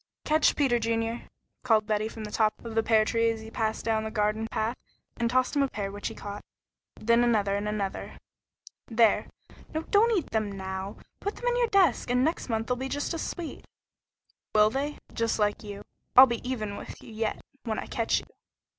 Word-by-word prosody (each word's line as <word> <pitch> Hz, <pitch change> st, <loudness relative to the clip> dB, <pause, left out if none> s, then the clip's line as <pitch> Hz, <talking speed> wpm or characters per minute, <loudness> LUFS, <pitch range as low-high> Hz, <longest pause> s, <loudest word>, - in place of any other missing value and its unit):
"Catch, 310 Hz, 0 st, +4 dB
Peter 260 Hz, -5 st, +2 dB
Junior," 230 Hz, +1 st, -1 dB, 0.3 s
called 220 Hz, -4 st, +3 dB
Betty 215 Hz, 0 st, 0 dB
from 220 Hz, 0 st, -8 dB
the 210 Hz, -, -6 dB
top 215 Hz, -1 st, +2 dB
of 230 Hz, -, -5 dB
the 225 Hz, -, +3 dB
pear 220 Hz, -1 st, +4 dB
tree 230 Hz, +1 st, +2 dB
as 225 Hz, -1 st, -2 dB
he 220 Hz, 0 st, -10 dB
passed 220 Hz, -1 st, -2 dB
down 220 Hz, -1 st, +1 dB
the 220 Hz, -, -3 dB
garden 215 Hz, +1 st, 0 dB
path, 225 Hz, +2 st, -1 dB, 0.4 s
and 235 Hz, -1 st, +1 dB
tossed 255 Hz, +3 st, +2 dB
him 285 Hz, -, +3 dB
a 275 Hz, -, +3 dB
pear 200 Hz, -6 st, -4 dB
which 205 Hz, +1 st, -4 dB
he -, -, -6 dB
caught, 205 Hz, 0 st, -7 dB, 0.6 s
then 235 Hz, +2 st, +4 dB
another 210 Hz, -4 st, +2 dB
and 205 Hz, +1 st, -1 dB
another. 200 Hz, -2 st, -3 dB, 0.7 s
"There! 225 Hz, -1 st, +3 dB, 0.5 s
No, 315 Hz, -, -1 dB
don't 435 Hz, +4 st, +4 dB
eat 345 Hz, -, -3 dB
them 215 Hz, -2 st, 0 dB
now. 190 Hz, 0 st, -5 dB, 0.2 s
Put 405 Hz, -, -3 dB
them -, -, -8 dB
in 485 Hz, -, +1 dB
your 485 Hz, -1 st, +3 dB
desk, 375 Hz, -, +3 dB
and 250 Hz, +1 st, +3 dB
next 320 Hz, -2 st, -1 dB
month 225 Hz, -1 st, 0 dB
they'll 250 Hz, +1 st, -1 dB
be 265 Hz, +1 st, -4 dB
just 290 Hz, +5 st, -2 dB
as 330 Hz, -, -3 dB
sweet!" 340 Hz, -3 st, -5 dB, 0.9 s
"Will 215 Hz, 0 st, +6 dB
they? 285 Hz, +4 st, -2 dB, 0.2 s
Just 230 Hz, -1 st, 0 dB
like 210 Hz, -1 st, +1 dB
you? 205 Hz, -1 st, -7 dB, 0.3 s
I'll 260 Hz, -, +13 dB
be 235 Hz, -3 st, -3 dB
even 215 Hz, -5 st, -3 dB
with -, -, -9 dB
you 225 Hz, -, -11 dB
yet 220 Hz, 0 st, -2 dB, 0.3 s
when 220 Hz, -2 st, -1 dB
I -, -, -3 dB
catch 230 Hz, -1 st, 0 dB
you." -, -, -16 dB
225 Hz, 210 wpm, -28 LUFS, 215-255 Hz, 0.9 s, I'll